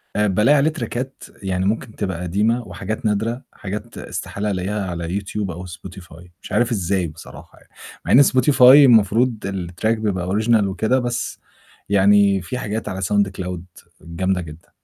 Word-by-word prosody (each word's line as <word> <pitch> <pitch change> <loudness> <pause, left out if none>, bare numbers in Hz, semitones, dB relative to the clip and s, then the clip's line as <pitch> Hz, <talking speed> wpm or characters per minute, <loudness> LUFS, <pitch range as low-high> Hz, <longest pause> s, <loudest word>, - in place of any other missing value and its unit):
آآ 105 0 +2
بالاقي 110 +10 +3
عليه 145 +3 +3
تراكات 135 -4 -5 0.2
يعني 95 0 -1
ممكن 110 +2 -2
تبقى 95 -4 -3
قديمة 105 +7 0
وحاجات 110 +2 -6
نادرة، 110 +4 -1
حاجات 105 +1 -7
استحالة 105 +1 -4
ألاقيها 100 +2 -2
على 85 0 -4
يوتيوب 100 -1 -3
أو 90 +2 -8
Spotify، 90 -1 -11
مش - - -11
عارف 120 0 +1
إزاي 95 -3 0
بصراحة 80 +1 -13
يع - - -24 0.4
مع - - -2
إن 140 - +8
Spotify 130 0 +2
المفروض 125 -3 +6
الTrack 90 0 -4
بيبقى 95 -5 -2
original 110 +1 +2
وكده، 110 +7 0
بس 120 -1 -3 0.5
يعني 100 0 +4
في 125 +8 -5
حاجات 110 -2 -4
على 95 -1 -5
sound 100 +1 +1
cloud 90 -1 -5 0.4
جامدة 90 +3 -2
جدًا. 80 -1 -12
100 Hz, 160 wpm, -20 LUFS, 90-115 Hz, 0.5 s, إن